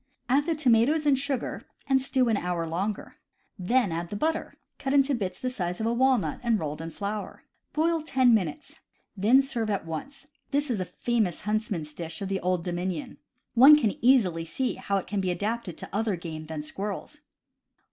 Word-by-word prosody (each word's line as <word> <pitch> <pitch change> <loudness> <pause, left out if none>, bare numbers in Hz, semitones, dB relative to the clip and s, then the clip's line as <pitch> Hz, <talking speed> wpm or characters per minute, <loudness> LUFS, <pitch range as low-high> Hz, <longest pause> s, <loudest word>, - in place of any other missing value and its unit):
Add 280 +5 +2
the 330 - +1
tomatoes 285 +2 +3
and 285 -2 +5
sugar, 270 -1 -3 0.2
and 270 -1 +3
stew 260 -1 +2
an 225 - +2
hour 175 -3 -2
longer. 190 +6 -3 0.4
Then 215 +2 +2
add 170 +1 -3
the 205 - -5
butter, 315 +9 -1 0.2
cut 270 +1 -1
into 275 0 +4
bits 190 -7 -3
the 255 - -2
size 180 -7 -3
of 220 - -1
a 230 - +1
walnut 255 -2 +2
and 235 -2 +2
rolled 150 -1 -4
in 165 - -5
flour. 205 +5 -5 0.3
Boil 325 +1 +1
ten 260 -5 +3
minutes. 180 -9 -2 0.4
Then 230 +8 +5
serve 235 -5 -2
at 200 -5 -1
once. 275 - -7 0.2
This 285 -1 0
is 220 - -1
a 185 - -1
famous 220 -5 -1
huntsman's 210 -8 -2
dish 160 0 -5
of 195 - -4
the 195 -1 -1
Old 180 -1 -1
Domin 175 +1 -2
ion. 255 -3 -10 0.4
One 270 +5 +9
can 225 -9 +1
easily 205 -10 +4
see 245 +11 -2
how 200 - -2
it 190 - -3
can 205 -2 -2
be 185 - -1
adapted 205 0 -2
to - - -8
other 215 -2 +1
game 160 -2 -7
than 155 -2 -5
squirrels. 200 - -5
215 Hz, 195 wpm, -27 LUFS, 180-265 Hz, 0.4 s, One